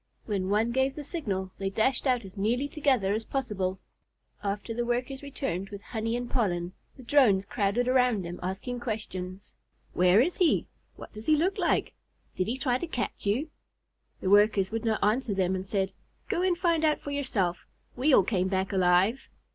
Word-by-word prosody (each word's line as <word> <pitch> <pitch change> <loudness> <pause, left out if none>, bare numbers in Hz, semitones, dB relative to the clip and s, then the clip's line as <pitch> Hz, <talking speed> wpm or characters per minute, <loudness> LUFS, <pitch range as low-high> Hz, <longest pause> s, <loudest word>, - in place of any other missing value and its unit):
When 195 -3 -2
one 215 +3 +2
gave 265 +2 +1
the 300 - -6
signal, 200 - -3
they 195 -1 -1
dashed 235 +7 +1
out 250 -4 +1
as 190 - -12
nearly 235 +7 0
together 265 -10 +1
as 220 +1 -1
possible. 195 -8 -2 0.6
After 205 +3 -3
the 240 +1 -1
Workers 245 +3 -2
returned 230 -10 -4
with 200 -1 -9
honey 225 0 -2
and 245 0 -4
pollen, 180 -8 -1 0.2
the 260 - -11
Drones 235 -8 +4
crowded 220 +3 0
around 250 -6 +3
them, 175 +1 -6
asking 195 +7 -4
questions. 200 -5 -5 0.4
"Where 180 +3 +5
is 320 +9 +2
he? 350 -4 +3 0.3
What - - -11
does 215 +1 -9
he 310 - +6
look 360 +6 0
like? - - +1 0.4
Did 185 - -1
he 240 +4 -1
try 255 -2 0
to 345 - -4
catch 245 -7 -4
you?" 255 +10 0 0.7
The 185 - 0
Workers 205 -1 +4
would 225 +1 -3
not 220 -1 0
answer 215 0 +1
them, 190 -1 +1
and 185 0 -2
said: 195 -1 0 0.4
"Go 345 - 0
and 365 -1 +2
find 335 -3 +1
out 305 -1 +3
for 285 - -6
yourself. 210 -11 -1 0.3
We 270 +5 +2
all 230 - +7
came 185 -2 0
back 190 +1 -1
alive." 185 +6 +3
220 Hz, 185 wpm, -28 LUFS, 195-265 Hz, 0.7 s, all